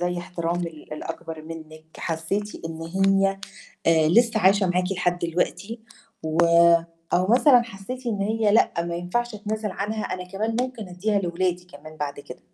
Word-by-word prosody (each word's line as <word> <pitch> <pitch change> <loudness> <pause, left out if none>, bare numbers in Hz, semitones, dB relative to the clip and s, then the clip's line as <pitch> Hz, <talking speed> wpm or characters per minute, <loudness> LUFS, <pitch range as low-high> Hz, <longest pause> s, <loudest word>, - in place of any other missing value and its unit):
زَي 175 0 -1
احترام 175 0 -3
ال 155 -2 -10
الأكبر 155 +1 -6
منِك، 155 -1 -10
حسيتِ 170 +5 -3
إن 165 0 -6
هي، 195 +3 +2 0.5
آآ، 160 -2 +5
لسه 230 +4 +4
عايشة 195 0 +4
معاكِ 180 +1 0
لحد 180 -1 0
دلوقتي 180 +6 -2 0.4
و 160 0 -2 0.8
أو 180 +1 +3
مثلًا 245 +3 +6
حسيتِ 235 +4 -8
إن 210 -4 -1
هي 215 +1 +1
لأ 225 - +4
ما 170 - -3
ينفعش 215 +7 -2
أتنازل 215 0 -3
عنها 210 +3 -3
أنا 185 0 -4
كمان 215 +4 -2
ممكن 250 -5 -5
أدّيها 200 +3 0
لولادي 180 0 -1
كمان 155 -2 -13
بعد 145 -1 -4
كده؟ 140 -3 -10
185 Hz, 160 wpm, -24 LUFS, 165-210 Hz, 0.8 s, مثلًا